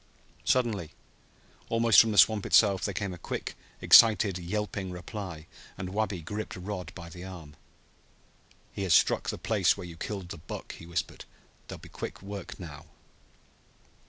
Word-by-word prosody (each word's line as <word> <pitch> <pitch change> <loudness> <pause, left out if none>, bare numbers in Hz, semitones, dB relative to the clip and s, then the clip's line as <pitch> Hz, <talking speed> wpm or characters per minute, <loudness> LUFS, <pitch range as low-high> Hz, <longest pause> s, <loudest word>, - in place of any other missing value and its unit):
Suddenly, 110 -10 0 0.8
almost 115 -3 +5
from 115 - 0
the 105 - -2
swamp 105 +1 +6
itself, 100 -4 +4
there 100 - -1
came 100 -1 -3
a 90 - -10
quick, - - -5 0.3
excited, 105 -4 +6
yelping 100 +1 -3
reply, 90 -3 -7 0.3
and 95 - -5
Wabi 100 -5 -2
gripped 105 +7 -5
Rod 90 -2 -6
by 85 - -9
the 90 +2 -10
arm. 85 -6 -10 1.2
"He - - -5
has 95 -4 +3
struck - - +3
the - - -3
place 100 -6 +2
where 95 - -7
you 85 -2 -10
killed 95 -1 -5
the 85 - -7
buck," 80 - -8
he 85 - -12
whispered. 85 - -4 0.4
"There'll - - -8
be - - -12
quick - - -7
work 100 -1 -7
now!" 80 -3 -10
95 Hz, 160 wpm, -29 LUFS, 85-105 Hz, 1.2 s, swamp